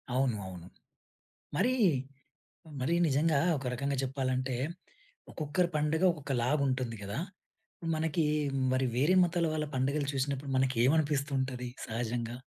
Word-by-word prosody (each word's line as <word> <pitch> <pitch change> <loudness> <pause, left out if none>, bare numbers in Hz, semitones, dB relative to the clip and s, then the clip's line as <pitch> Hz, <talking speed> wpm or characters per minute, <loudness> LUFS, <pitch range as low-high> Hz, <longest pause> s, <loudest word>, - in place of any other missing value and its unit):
అవును. 130 -3 +2
అవును. 90 -2 -9 0.9
మరి, 235 +8 +3 1.1
మరి 160 +7 +1
నిజంగా 150 +1 +3 0.2
ఒక 135 - -7
రకంగా 140 +2 -1
చెప్పాలంటే, 130 -1 -1 0.8
ఒక్కొక్కరి 170 +3 0
పండుగ 155 +4 +1
ఒక్కొక్క 145 -4 -5
లాగా 145 +3 +2
ఉంటుంది 130 -3 -1
కదా! 100 +6 -3 0.8
మనకి 160 0 +1 0.5
మరి 130 0 +2
వేరే 150 +9 +3
మతాల 175 -1 +1
వాళ్ళ 155 -1 -1
పండుగలు 140 +3 0
చూసినప్పుడు, 135 +1 -2
మనకి 130 0 +2
ఏమనిపిస్తుంటది 135 -4 +1 0.2
సహజంగా? 120 +1 -3
135 Hz, 115 wpm, -31 LUFS, 130-150 Hz, 1.1 s, మరి